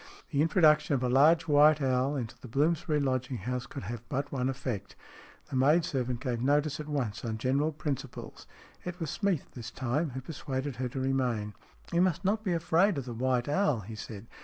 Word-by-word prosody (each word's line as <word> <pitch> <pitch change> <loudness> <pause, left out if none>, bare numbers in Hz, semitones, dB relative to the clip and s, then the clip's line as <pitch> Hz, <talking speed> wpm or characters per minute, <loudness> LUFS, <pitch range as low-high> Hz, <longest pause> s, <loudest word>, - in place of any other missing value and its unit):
The 145 -2 +2
introduction 155 -3 +4
of 130 - -1
a 125 - +1
large 155 +6 +5
white 150 +1 +6
owl 130 +1 +1
into 120 -5 -3
the - - -9
Bloomsbury 155 +5 +1
lodging 130 -2 -1
house 125 +1 -4
could 135 - -7
have 115 +3 -5
but 140 +1 -2
one 130 -1 0
effect. 130 -6 -4 0.6
The - - -3
maid 150 +6 +4
servant 125 -5 -2
gave 125 -4 -2
notice 145 +3 +2
at 150 - -6
once 130 -8 -2
on 110 -2 -2
general 135 +6 +1
principles. 145 -3 -5 0.4
It 180 0 -6
was 160 -4 -3
Smeath 200 -7 -1
this 120 -2 -7
time 130 +6 -1
who 130 0 -6
persuaded 135 -2 -4
her 125 0 -2
to 135 - -5
remain. 125 -6 0 0.2
" - - -18
You 170 - +4
must 185 0 +1
not 215 +3 +1
be 185 -5 0
afraid 170 +3 +2
of 135 - -3
the 120 - -5
white 125 +1 0
owl," 150 - +1
he 110 +3 -9
said. 110 -1 -8
135 Hz, 205 wpm, -30 LUFS, 125-155 Hz, 0.6 s, white